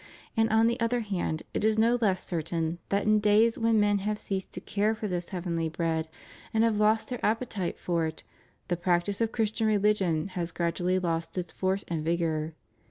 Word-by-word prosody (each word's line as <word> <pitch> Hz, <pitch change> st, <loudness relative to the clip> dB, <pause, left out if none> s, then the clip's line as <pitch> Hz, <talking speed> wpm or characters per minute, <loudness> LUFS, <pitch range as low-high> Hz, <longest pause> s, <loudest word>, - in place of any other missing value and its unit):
And 225 Hz, 0 st, +3 dB
on 220 Hz, +1 st, +4 dB
the 235 Hz, +2 st, +1 dB
other 235 Hz, +1 st, +1 dB
hand 185 Hz, -7 st, -2 dB
it -, -, -1 dB
is 220 Hz, 0 st, +3 dB
no 230 Hz, +2 st, +4 dB
less 190 Hz, -4 st, +1 dB
certain 165 Hz, 0 st, -2 dB
that 200 Hz, 0 st, +1 dB
in 215 Hz, 0 st, +4 dB
days 215 Hz, +2 st, +4 dB
when 225 Hz, -1 st, +3 dB
men 205 Hz, -1 st, +3 dB
have 210 Hz, +2 st, -1 dB
ceased 195 Hz, -2 st, -4 dB
to -, -, -4 dB
care 210 Hz, +2 st, 0 dB
for 215 Hz, -1 st, -4 dB
this 175 Hz, -2 st, -3 dB
heavenly 170 Hz, -3 st, -2 dB
bread, 160 Hz, -1 st, -1 dB, 0.5 s
and 220 Hz, -, +4 dB
have 225 Hz, -2 st, +2 dB
lost 215 Hz, +1 st, +2 dB
their 245 Hz, -2 st, -5 dB
appetite 220 Hz, -5 st, -1 dB
for 170 Hz, -2 st, 0 dB
it, 160 Hz, -, -7 dB, 0.4 s
the 175 Hz, -, 0 dB
practice 175 Hz, +4 st, 0 dB
of 225 Hz, -1 st, +1 dB
Chris 220 Hz, -3 st, 0 dB
tian 220 Hz, 0 st, 0 dB
religion 200 Hz, -5 st, +2 dB
has 175 Hz, -2 st, -3 dB
gradually 175 Hz, +2 st, 0 dB
lost 165 Hz, -1 st, -2 dB
its 175 Hz, -2 st, -3 dB
force 190 Hz, +1 st, -1 dB
and 165 Hz, -2 st, -2 dB
vigor. 160 Hz, -1 st, -1 dB
195 Hz, 200 wpm, -28 LUFS, 170-220 Hz, 0.5 s, on